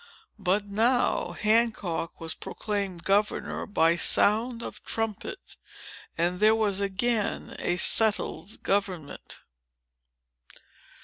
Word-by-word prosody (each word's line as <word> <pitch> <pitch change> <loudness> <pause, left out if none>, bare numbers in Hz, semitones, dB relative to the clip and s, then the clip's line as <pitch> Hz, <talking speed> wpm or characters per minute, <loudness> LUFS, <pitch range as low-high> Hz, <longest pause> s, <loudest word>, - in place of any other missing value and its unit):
But 200 +2 0
now, 220 -3 0
Hancock 210 -5 -1
was 165 -1 -4
proclaimed 200 -5 -5
governor 205 +3 -1
by 165 -5 +2
sound 230 +7 +3
of - - -9
trumpet; 225 -3 -5 0.6
and 175 +2 -1
there 215 +1 +4
was 205 -3 -1
again 205 +3 -2
a 175 - -1
settled 215 +1 +3
government." 185 -7 -3
205 Hz, 90 wpm, -26 LUFS, 180-220 Hz, 0.6 s, there